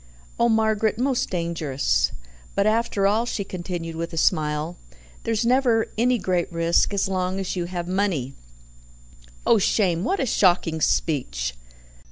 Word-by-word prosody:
"Oh, 235 0 +4
Margaret, 220 -1 +2
most 255 +1 0
dangerous." 150 - 0 0.4
"But 200 - +2
after 215 -2 +1
all," 220 +4 +2
she 205 - -2
continued 175 -3 -5
with 170 +1 -4
a - - -5
smile, 155 +1 0 0.5
"there's 225 0 0
never 240 -2 +2
any 245 +3 +2
great 185 -3 -1
risk 170 +2 +2
as 200 0 0
long 185 0 -1
as 190 -1 -3
you 175 -1 -2
have 175 -1 -5
money." 180 -9 -1 1.1
"Oh, 225 - +5
shame! 185 -4 +1
What 385 - 0
a - - +1
shocking 175 -7 +2
speech!" 95 - 0
185 Hz, 145 wpm, -24 LUFS, 165-220 Hz, 1.1 s, Oh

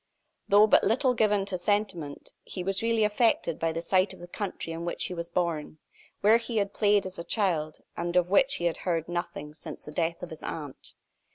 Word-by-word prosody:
Though 205 +1 +7
but 215 - +5
little 250 +5 +3
given 210 -4 +2
to 190 -2 -3
sentiment, 175 -6 -2
he 180 - -6
was 195 +1 0
really 230 -1 +2
affected 210 -6 +2
by 165 0 +1
the 165 +1 -4
sight 185 +2 +2
of - - -13
the 175 - -9
country 180 -3 -4
in 165 +1 -5
which 170 - -1
he - - -3
was 170 -1 -5
born 170 -4 -2 0.4
where 215 +3 +6
he 230 0 -4
had 200 -1 0
played 205 -2 +3
as 185 -1 -7
a - - -4
child, 170 -7 0 0.2
and 175 +1 -3
of 180 0 +3
which 270 +6 +4
he 175 - -3
had 170 - +1
heard 165 -3 -1
nothing 175 -4 -4
since 155 -1 -9
the 150 - -8
death 165 +2 -1
of 175 - -6
his 160 - -9
aunt. 145 -4 -7
180 Hz, 215 wpm, -28 LUFS, 165-205 Hz, 0.4 s, Though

